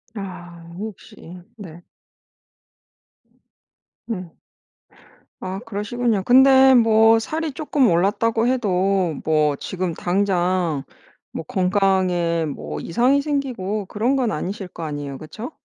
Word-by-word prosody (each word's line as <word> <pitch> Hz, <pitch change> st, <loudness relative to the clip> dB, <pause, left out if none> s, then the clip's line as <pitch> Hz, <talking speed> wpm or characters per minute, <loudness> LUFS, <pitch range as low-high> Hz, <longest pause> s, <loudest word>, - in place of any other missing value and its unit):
아 175 Hz, -4 st, -9 dB
혹시 180 Hz, -4 st, -10 dB, 0.2 s
네. 175 Hz, -5 st, -11 dB, 2.3 s
음. 180 Hz, -7 st, -6 dB, 1.0 s
아 190 Hz, +1 st, -5 dB
그러시군요. 215 Hz, 0 st, -1 dB
근데 265 Hz, +2 st, +6 dB
뭐 225 Hz, -1 st, +5 dB
살이 315 Hz, +7 st, -3 dB
쪼끔 285 Hz, -3 st, +1 dB
올랐다고 225 Hz, +6 st, +1 dB
해도 195 Hz, -7 st, +1 dB
뭐 155 Hz, -2 st, +2 dB
지금 185 Hz, 0 st, -4 dB
당장 180 Hz, -5 st, 0 dB, 0.5 s
뭐 -, -, -6 dB
건강에 185 Hz, -3 st, +1 dB
뭐 75 Hz, -, -6 dB
이상이 255 Hz, +10 st, +2 dB
생기고 250 Hz, -9 st, -3 dB
그런 230 Hz, +8 st, 0 dB
건 250 Hz, -5 st, 0 dB
아니실 190 Hz, +4 st, -4 dB
거 170 Hz, -, -11 dB
아니에요. 145 Hz, -3 st, -5 dB
그쵸? 220 Hz, -, -8 dB
195 Hz, 205 characters per minute, -21 LUFS, 175-230 Hz, 2.3 s, 근데